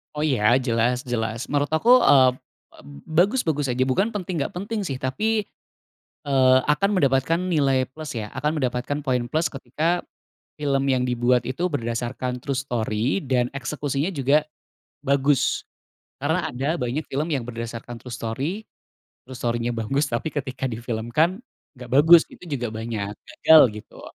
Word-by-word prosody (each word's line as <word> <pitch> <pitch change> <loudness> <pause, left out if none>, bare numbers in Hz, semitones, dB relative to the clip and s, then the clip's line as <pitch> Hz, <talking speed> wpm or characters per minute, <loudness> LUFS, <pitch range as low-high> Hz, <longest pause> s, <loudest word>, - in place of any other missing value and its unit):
Oh 150 - -1
ya, 125 -5 +3
jelas 125 +1 0
jelas 110 0 -2
menurut 145 0 +1
aku, 225 +10 +2 0.2
eee, 130 -2 +6 0.5
eb - - -16 0.3
bagus 205 +9 +4
bagus 145 -3 0
aja 130 +1 +1
bukan 205 - +1
penting 185 -4 -3
nggak - - -6
penting 210 +4 -3
sih 135 - -3
tapi, 215 +11 0 0.8
eee, 130 -2 +4 0.2
akan 195 +7 +1
mendapatkan 140 +1 +2
nilai 135 -5 +2
plus 155 +2 -8
ya, 105 - -6
akan 150 +4 -1
mendapatkan 125 +3 -2
poin 125 -3 0
plus 160 +2 +1
ketika, 155 +6 -2 0.6
film 140 -2 +1
yang 130 -1 +2
dibuat 125 0 +1
itu 170 +8 -1
berdasarkan 120 0 -3
true 140 -2 -2
story 120 - -1
dan 125 -2 +1
eksekusinya 145 +4 -2
juga, 145 +2 +2 0.6
bagus. 140 0 +1 0.6
Karena 160 +5 0
ada 140 +7 -2
banyak 125 +5 -2
film 145 +4 -1
yang 140 -4 0
berdasarkan 115 0 -6
true 125 +1 -8
story 135 - -3 0.6
true 130 0 -10
story-nya 120 0 -1
bagus 135 +6 -1
tapi 120 +7 -2
ketika 130 -2 -3
difilmkan 120 - -1 0.4
nggak 125 -1 -10
bagus 160 +4 +8
itu - - -16 0.2
juga 120 -1 -3
banyak, 110 -2 -4
gagal 160 -1 +6
gitu. 105 - -12
135 Hz, 150 wpm, -23 LUFS, 120-150 Hz, 0.8 s, bagus